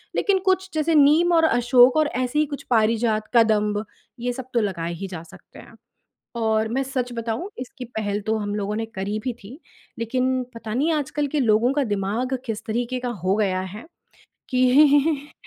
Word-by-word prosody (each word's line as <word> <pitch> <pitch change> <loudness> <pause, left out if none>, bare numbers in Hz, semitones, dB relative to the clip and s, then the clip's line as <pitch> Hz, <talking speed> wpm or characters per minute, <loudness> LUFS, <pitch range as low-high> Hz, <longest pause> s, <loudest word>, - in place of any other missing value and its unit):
लेकिन 400 -2 +2
कुछ 380 0 +1
जैसे 315 +1 +1
नीम 305 +5 +5
और 330 -1 +4
अशोक 245 0 +4
और 310 - +3
ऐसी 255 +3 -1
ही 305 - +3
कुछ 285 -1 -7
पारिजात, 220 -1 +1
कदम्ब, 210 -2 +3 0.3
ये 245 +1 -2
सब 260 0 -7
तो 235 - +2
लगाए 170 -4 -3
ही 195 +4 -6
जा 175 -4 -7
सकते 170 - -16
हैं। - - -15 0.6
और 220 -1 +1
मैं 265 +4 0
सच 255 -2 -3
बताऊँ 230 - -4
इसकी 255 +1 -7
पहल 215 -3 -3
तो 220 - +1
हम 205 -1 -3
लोगों 210 0 -2
ने 225 - -2
करी 195 +2 -3
भी 250 - -2
थी, 255 - -11 0.4
लेकिन 255 +2 0
पता 225 -2 -6
नहीं 290 +7 +1
आजकल 295 0 -1
के 295 +2 -1
लोगों 235 +1 +3
का 290 0 +1
दिमाग 220 +4 -2
किस 225 -3 -4
तरीके 240 +3 -2
का 245 -1 -3
हो 190 +1 +2
गया 190 -3 0
है 220 - -9 0.7
कि 285 +3 +3
245 Hz, 185 wpm, -23 LUFS, 215-275 Hz, 0.7 s, नीम